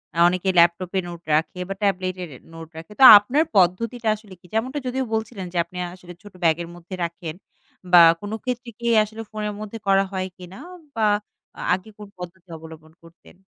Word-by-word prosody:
আ - - -2
অনেকে 180 +2 -1
ল্যাপটপ 170 +1 +3
এ - - +3
নোট 170 -1 -9
রাখে 165 +3 -1
বা - - -2
ট্যাবলেট 185 -2 0
এর 175 - -8 0.2
নোট 165 0 -9
রাখে। 165 +4 -10
তো - - +5
আপনার 245 +10 +1
পদ্ধতিটা 220 +6 +1
আসলে 210 -2 -15
কি? - - -24
যেমনটা 255 +6 -1
যদিও 260 +1 -1
বলছিলেন 220 -3 -3
যে - - -3
আপনি 180 +1 -12 0.2
আসলে 180 -1 -12
ছোট 205 - -13
ব্যাগ 160 -2 +4
এর 170 - -10
মধ্যে 175 +2 -9
রাখেন 170 -1 -5 0.6
বা 175 - +9 0.2
কোনো 205 +2 -5
ক্ষেত্রে 250 -1 -4
কি 235 - -8 0.2
আসলে 220 +1 -8
ফোনের 210 -1 -4
মধ্যে 215 +1 -7
করা 195 0 +4
হয় 185 -1 -3
কিনা 180 0 -12 0.4
বা 220 -1 +1 0.5
আ - - -6
আগে 185 +4 -4
কোনো 210 -1 -11
পদ্ধতি 180 0 -10
অবলম্বন 160 0 -13
করতেন? 165 +2 -19
185 Hz, 195 wpm, -22 LUFS, 175-215 Hz, 0.6 s, বা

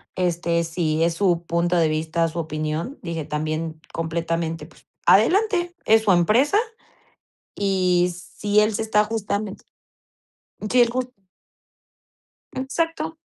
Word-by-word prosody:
este, 170 -2 0
si 160 -1 -1
es 170 - +1
su 175 -2 +1
punto 175 +1 +1
de 165 -2 +3
vista, 160 +2 0
su 165 +1 -5
opinión", 155 - -3
dije: 165 -3 -4
"También 155 +2 -3
completamente, 165 -1 -2
pues - - -20 0.2
adelante, 350 - +3
es 220 0 +5
su 205 - +3
empresa, 220 - +3 1.0
y 180 -3 +2
si 205 +3 -1
él 215 +1 +3
se 205 - -2
está 210 -1 +2
justamen" 210 -2 -3 1.2
sí, 250 0 +5
el 235 - +2
jus 255 +1 -2 1.5
Exacto. 320 +4 -2
180 Hz, 120 wpm, -23 LUFS, 165-220 Hz, 1.5 s, es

